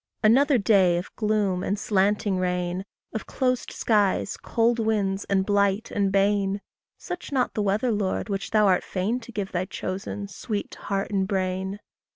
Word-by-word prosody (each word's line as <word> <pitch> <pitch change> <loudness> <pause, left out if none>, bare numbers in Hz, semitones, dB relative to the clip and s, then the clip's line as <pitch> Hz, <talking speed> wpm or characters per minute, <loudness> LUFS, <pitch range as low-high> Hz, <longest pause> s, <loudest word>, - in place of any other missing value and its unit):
Another 265 +6 +5
day 195 -5 +4
of 175 - -6
gloom 210 -4 +1
and 200 +2 -1
slanting 200 -1 +1
rain! 180 0 -1 0.3
Of 220 - -4
closed 255 -2 0
skies, 205 -3 +1
cold 235 0 +1
winds, 205 -3 0
and 190 -1 +1
blight 200 +1 +1
and 200 -1 +1
bane! 200 0 +2 0.4
Such 360 -3 -7
not 260 -3 +1
the 215 - -1
weather, 210 +5 +1
Lord, 205 -2 -1
which 195 -2 -3
thou 215 -1 +4
art 185 -2 +3
fain 200 +6 -1
To 235 0 -11
give 205 -3 -4
thy 180 0 -1
chosen, 195 +2 -5
sweet 205 +1 -4
to - - -11
heart 195 0 -2
and 190 -2 +1
brain! 190 0 -2
200 Hz, 170 wpm, -25 LUFS, 190-215 Hz, 0.4 s, Another